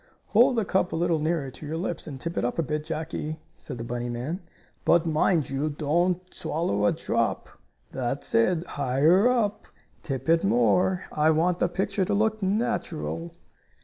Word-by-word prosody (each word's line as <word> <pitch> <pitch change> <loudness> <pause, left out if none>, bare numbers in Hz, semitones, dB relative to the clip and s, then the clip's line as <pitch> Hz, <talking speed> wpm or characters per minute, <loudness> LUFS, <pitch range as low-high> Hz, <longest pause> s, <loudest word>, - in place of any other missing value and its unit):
"Hold 245 +4 +5
the 225 -3 +1
cup 185 -1 +1
a - - -2
little 170 -1 +1
nearer 155 -3 -1
to - - -12
your 160 +2 -3
lips, 175 -1 -4
and 140 -4 -7
tip 165 +4 -4
it - - -1
up 120 - -1
a 165 - +2
bit, 150 0 -2
Jackie," 155 0 -4 0.2
said 135 - -8
the 115 - -5
bunny 120 +1 -3
man. 130 +10 -4 0.4
"But, 170 0 +4
mind 155 -1 +2
you, 140 +3 0
don't 175 +5 0
swallow 105 -11 0
a - - +4
drop. - - -1 0.4
That's 130 +2 -3
it, 160 +10 +3
higher 150 - +3
up! 220 -5 0 0.3
Tip 135 -4 -4
it 165 0 +4
more. 190 -4 +2
I 150 +1 +3
want 170 +3 +2
the 175 - +2
picture 195 +2 -1
to 185 - 0
look 220 +1 +1
natural." 190 -5 -2
165 Hz, 180 wpm, -26 LUFS, 145-185 Hz, 0.4 s, Hold